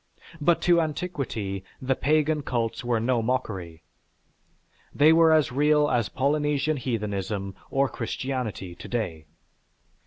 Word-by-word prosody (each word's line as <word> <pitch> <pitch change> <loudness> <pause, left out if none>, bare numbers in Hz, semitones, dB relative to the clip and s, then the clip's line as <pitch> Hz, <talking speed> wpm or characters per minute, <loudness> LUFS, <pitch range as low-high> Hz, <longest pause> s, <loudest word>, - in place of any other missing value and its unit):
But 170 +3 +3
to 175 -1 +5
antiquity 140 - -3 0.2
the 130 0 0
'pagan' 155 +2 +1
cults 120 -5 -2
were 120 -2 +1
no 120 +1 +1
mockery. 95 -9 -3 1.1
They 155 +2 +6
were 165 0 +6
as 155 -4 +3
real 150 +2 +3
as 120 -4 +1
Polynesian 145 +2 0
heathenism 100 -5 -3 0.2
or 135 0 +2
Christianity 125 -11 -4
to - - -10
day." 85 -10 -3
130 Hz, 120 wpm, -26 LUFS, 110-150 Hz, 1.1 s, They